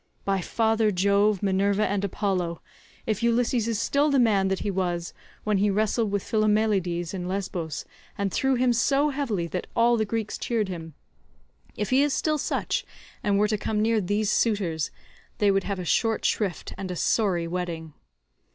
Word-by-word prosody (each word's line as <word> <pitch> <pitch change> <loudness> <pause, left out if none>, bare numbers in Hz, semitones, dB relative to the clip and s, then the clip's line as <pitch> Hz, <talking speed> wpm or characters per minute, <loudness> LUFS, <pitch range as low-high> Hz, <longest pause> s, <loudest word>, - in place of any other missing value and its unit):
By 195 -1 +1
father 225 +2 +1
Jove, 200 +1 +2
Minerva, 200 +2 +2
and 200 0 -1
Apollo, 180 -4 -1 0.5
if 215 -2 -1
Ulysses 235 0 +2
is 230 -2 0
still 285 +7 +2
the 280 - +3
man 210 -6 +3
that 190 0 -1
he 205 - -1
was 175 -2 -2 0.3
when 210 -2 +1
he 205 +1 +3
wrestled 215 +2 +1
with 200 -1 -1
Philomeleides 210 -6 +1
in 180 -2 -4
Lesbos, 180 -5 -3 0.3
and 200 -2 -1
threw 265 -1 +2
him 250 0 +3
so 275 +5 +2
heavily 245 -11 -1
that 180 - -4
all 235 0 +4
the 220 - +2
Greeks 220 0 -3
cheered 220 -5 -1
him—if 65 - -9
he 260 +2 +5
is 290 -1 +2
still 305 -1 0
such, - - -1 0.4
and 200 -1 +1
were 210 +1 +3
to 210 -1 -1
come 215 0 -1
near 220 0 +2
these 205 +3 0
suitors, 190 -10 +1 0.5
they 205 -1 +3
would 195 -1 +1
have 200 -1 -2
a 180 - -5
short 225 +5 +1
shrift 195 -7 -1
and 190 - -4
a 180 - -3
sorry 180 -3 +1
wedding. 165 -3 -4
205 Hz, 175 wpm, -26 LUFS, 180-225 Hz, 0.5 s, he